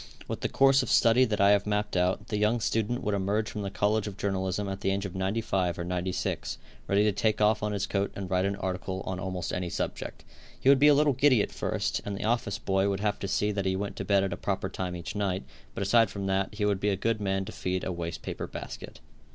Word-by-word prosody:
With - - -4
the - - -1
course 135 0 +5
of 130 - -4
study 120 +2 +5
that 110 -3 -2
I 100 +1 +6
have 100 0 +3
mapped 105 -1 -1
out, 90 +3 0
the 105 - -1
young 105 +3 +2
student 115 +3 -1
would 105 - 0
emerge 100 +2 0
from 105 - -4
the 100 - -3
college 105 +2 +1
of 100 -1 -7
journalism 95 0 -1
at 95 0 -5
the - - +1
age 100 +1 -1
of 95 - -5
95 95 -2 -1
or 85 - -3
96, 90 +1 -2 0.3
ready 100 +1 +3
to 105 - +3
take 105 +2 0
off 105 0 +4
his 105 -2 -1
coat 100 0 -1
and 100 -1 -5
write 90 +1 +1
an 100 0 0
article 95 0 -3
on 95 -1 -3
almost 95 -1 -3
any 90 -1 -2
subject. - - -4 0.4
He 135 - +3
would 140 -1 +7
be 145 - +6
a 145 - +7
little 145 0 +4
giddy 130 -4 +4
at - - -5
first, - - -2
and 100 -1 -4
the - - -4
office 115 -3 0
boy 95 0 +1
would 100 0 -2
have 105 -1 0
to 100 - -3
see 105 +2 +1
that 100 -2 -2
he 95 - +1
went 100 +1 -3
to - - -3
bed 100 -1 +3
at 95 -2 -1
a - - -5
proper 95 0 -2
time 90 -1 -4
each 85 +3 -6
night, 95 -2 -1 0.3
but - - -2
aside 115 +2 +4
from 100 -1 -5
that, 95 +1 0
he 105 -1 0
would 100 -2 +1
be 105 - +1
a 100 - +1
good 110 +2 0
man 95 -1 0
to - - -7
feed 90 0 -2
a - - -2
waste 85 -1 -5
paper - - -4
basket. - - -8
100 Hz, 260 wpm, -28 LUFS, 95-105 Hz, 0.4 s, would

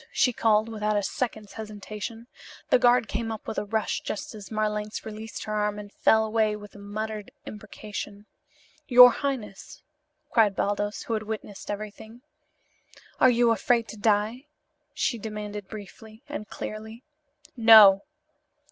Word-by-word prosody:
she 250 - +2
called, 220 -1 +2
without 215 -1 -1
a 205 - 0
second's 215 -1 -4
hesitation. 215 +1 -7 0.5
The - - +6
guard 245 -1 +4
came 225 -1 -3
up 220 - -7
with 220 - -2
a - - -4
rush 220 +1 -1
just 210 - -5
as 210 -2 -10
Marlanx 210 -1 -2
released 220 -1 -7
her 215 - -5
arm 210 0 0
and 205 -1 -9
fell 220 0 +3
away 215 -1 +1
with 205 -1 -11
a 205 - -13
muttered 210 +1 -5 0.2
imprecation. 210 -1 -8 0.6
"Your 250 -1 +9
highness!" 245 -8 -5 0.5
cried 215 -4 +3
Baldos, 205 +1 -1
who 230 - -4
had 215 - -1
witnessed 215 -2 -7
everything. 215 +3 -7 1.0
"Are 260 - +7
you 240 -1 +3
afraid 230 0 +1
to - - -7
die?" 215 +5 0 0.5
she 235 - -1
demanded 210 -2 -6
briefly; 215 +3 -11
and 290 -8 -6
clearly. 220 +3 -7 0.5
"No!" 220 -5 +8
215 Hz, 145 wpm, -26 LUFS, 210-225 Hz, 1.0 s, Your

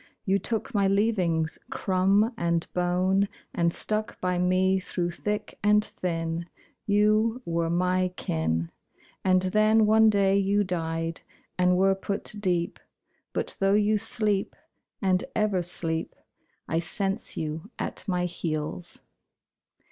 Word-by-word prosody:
You 195 0 +2
took 225 +6 -2
my 200 -2 +3
leavings, 190 -6 +1
crumb 195 +4 +2
and 170 -4 0
bone, 185 +2 +1 0.3
And 170 0 +1
stuck 215 +4 -1
by 180 -1 0
me 185 +1 +2
through 175 -1 -2
thick 210 +4 -4
and 210 +1 +4
thin 165 -2 -3 0.4
You 215 +4 +2
were 165 0 -1
my 180 +2 +1
kin. 80 - -1 0.5
And 185 -1 +3
then 215 +3 +4
one 220 +1 +5
day 200 -1 +3
you 200 +1 +2
died 165 -2 -3 0.3
And 180 0 +3
were 195 +1 +4
put 200 +2 -4
deep. 175 -4 0 0.5
But - - -3
though 195 +1 +3
you 210 +1 +3
sleep, 210 -3 0 0.5
and 185 -1 +2
ever 210 -4 +1
sleep, 165 -2 -1 0.5
I 165 - 0
sense 195 +3 -2
you 160 +4 -4
at - - -3
my 180 -2 0
heels. 165 -1 -4
185 Hz, 125 wpm, -27 LUFS, 170-205 Hz, 0.5 s, one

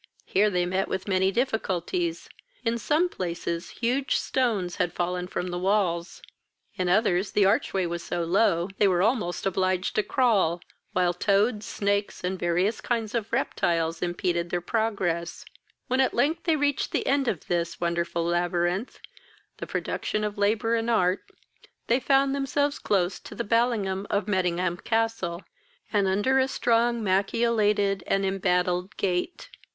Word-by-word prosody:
Here 210 +2 +3
they 180 -2 0
met 185 +2 0
with 190 +1 -4
many 190 0 +2
difficulties: 245 - -1 0.4
in 230 +1 0
some 305 +10 +2
places 170 - -4
huge 255 +4 0
stones 215 -9 0
had 175 - 0
fallen 180 0 -2
from 180 0 -3
the 175 - -3
walls, 185 -3 0 0.5
in 185 -1 -1
others 190 -1 +2
the 205 - +4
arch 195 - +2
way 190 -2 0
was 170 0 -3
so 170 - -2
low 175 0 +2
they 205 - +5
were 180 -1 +2
almost 210 -7 0
obliged 185 -1 0
to - - +2
crawl, 205 - +2 0.3
while 180 -1 +2
toads, 210 +4 +1
snakes, 200 -1 -1
and 185 +1 -2
various 180 +5 0
kinds 225 -3 -2
of 225 -3 -2
reptiles 165 -1 0
impeded 175 -1 -1
their 175 - 0
progress; 175 -5 -2 0.4
when, 260 +1 +1
at 260 - +1
length, 315 +4 +1
they 325 -2 +3
reached 285 -2 0
the - - 0
end 275 -1 +1
of 185 -9 -2
this 170 -1 -2
wonderful 170 0 -1
labyrinth, 175 +4 -1 0.6
the - - -6
production 215 - -2
of 210 -1 -2
labour 215 +3 +1
and 230 0 0
art, 185 -5 +1 0.6
they 240 +3 +2
found 270 +1 +3
themselves 285 +1 0
close 185 -2 0
to - - -11
the - - -2
ballium 205 -4 +1
of 205 - 0
Mettingham 180 -2 0
castle, 225 -6 -1 0.5
and 200 -2 +3
under 205 +8 +2
a 260 - +3
strong 235 -2 +1
machiolated 205 0 +1
and 195 0 +1
embattled 180 0 0
gate. 185 - -2
195 Hz, 155 wpm, -26 LUFS, 180-230 Hz, 0.6 s, they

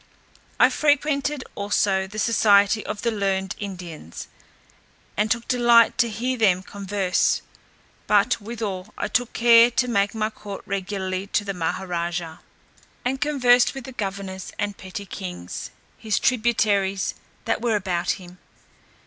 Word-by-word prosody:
I - - +6
frequented 290 -1 +1
also 200 -1 0
the 205 +2 -10
society 210 -1 +4
of 210 -1 -5
the 235 - +1
learned 195 -3 -1
Indians, 175 - -8 0.9
and 210 +1 +1
took 235 0 -1
delight 240 -1 +4
to 235 -2 +3
hear 245 +3 -2
them 190 -4 +3
converse; 195 -2 0 0.6
but 210 +3 +3
withal, 210 -3 -5
I - - -2
took 245 0 -1
care 235 0 +6
to 250 +1 0
make 200 -3 +1
my 215 0 -1
court 205 -2 -9
regularly 190 -1 -3
to 205 - 0
the 200 - -2
Maha 180 +2 -2
raja, 170 -2 -3 0.7
and 265 +2 -1
conversed 250 -4 +3
with 270 - -6
the 265 - -9
governors 195 -4 -5
and 205 -1 -2
petty 190 +2 -8
kings, 180 - -6 0.3
his 215 -4 0
tributaries, 210 -5 +1 0.3
that 225 0 0
were 230 -2 +1
about 185 -4 0
him. 180 -1 -14
205 Hz, 140 wpm, -23 LUFS, 190-235 Hz, 0.9 s, I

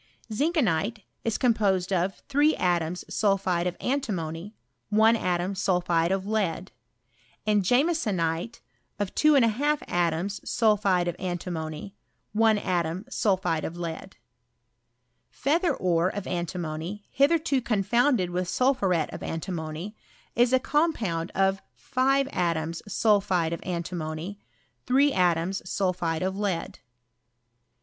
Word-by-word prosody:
Ziiikcnite 225 - 0 0.2
ie 230 - 0
composed 200 -6 +2
of 185 +1 -1
3 290 +2 +3
atoms 175 -1 0
sulphide 190 -4 +1
of 180 - -3
antimony 205 - -3 0.3
1 220 +2 +5
atom 180 -2 -1
sulpliide 175 -3 +1
of 190 0 -1
lead; 200 -4 -1 0.7
and 210 -1 +3
jiunesonite 220 - 0 0.4
of 205 -2 -3
24 290 0 +3
atoms 175 +3 -1
sulphide 205 -6 +2
of 175 - -2
antimony 175 -1 -4 0.4
1 220 0 +4
atom 180 -1 -1
sulphide 190 -9 +1
of 170 - -5
lead, 170 +2 -6 1.3
l 300 +4 +4
'ealher 360 - +1
ore 175 -1 +2
of 205 -1 -5
antimony, 175 +2 -4
hitherto 285 -1 +2
confounded 235 -2 +2
with 180 0 -1
Bulphuret 195 - +1
of - - -7
antimony, 165 +3 -5 0.4
is 240 +1 +4
a 260 - +6
compound 235 - 0
of 195 0 +2
5 270 +1 +1
atoms 165 -1 -1
sulphide 195 -6 +2
of 170 - -4
antimony 170 +1 -4 0.5
3 275 +3 +4
atoms 180 +1 +1
sulphide 180 -4 -1
of 190 +1 -1
lead. 195 -4 -2
190 Hz, 110 wpm, -26 LUFS, 175-225 Hz, 1.3 s, a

